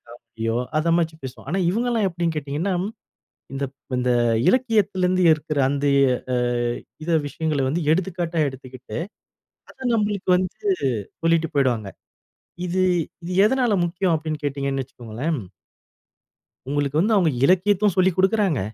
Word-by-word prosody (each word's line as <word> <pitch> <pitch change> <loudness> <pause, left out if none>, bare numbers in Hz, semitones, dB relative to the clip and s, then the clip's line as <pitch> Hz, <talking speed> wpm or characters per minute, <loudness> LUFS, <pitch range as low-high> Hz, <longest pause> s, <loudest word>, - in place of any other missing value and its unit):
காமெடியோ, 115 -1 -4 0.2
அத 165 +2 +1
மாதிரி 160 -2 -1
பேசுவோம். 130 +1 -9
ஆனா, 190 +3 0
இவங்கல்லாம் 230 0 +1
எப்படீன்னு 170 -2 -2
கேட்டீங்கன்னா, 150 +6 -2 0.8
இந்த 140 +1 -2
ப் 135 - -13
இந்த 125 - 0 0.4
இலக்கியத்துலருந்து 200 -7 +2
இருக்குற 155 -1 -4
அந்த 140 0 -1 0.5
அ - - +2 0.7
இத - - -5 0.2
விஷயங்கள 155 -2 -1
வந்து 165 +5 -1
எடுத்துக்காட்டா 175 -1 -2
எடுத்துக்கிட்டு, 130 +1 -8 0.7
அத - - -19 0.2
நம்மளுக்கு 205 -3 0
வந்து 185 0 -3 0.6
சொல்லிட்டு 165 -1 +2
போய்டுவாங்க. 120 -7 +1 0.8
இது 185 +1 0 0.4
இது 180 - -4
எதுனால 250 -1 +2
முக்கியம் 175 0 0
அப்படீன்னு 155 -1 -5
கேட்டீங்கன்னு 140 -1 -1
வச்சுக்கோங்களேன். 125 +5 -4 1.3
உங்களுக்கு 145 +1 0
வந்து 215 +5 +2
அவங்க 180 -5 +4 0.2
இலக்கியமும் 195 +3 +3
சொல்லிக் 185 -1 +3
குடுக்குறாங்க, 190 - +2
165 Hz, 120 wpm, -23 LUFS, 140-190 Hz, 1.3 s, அவங்க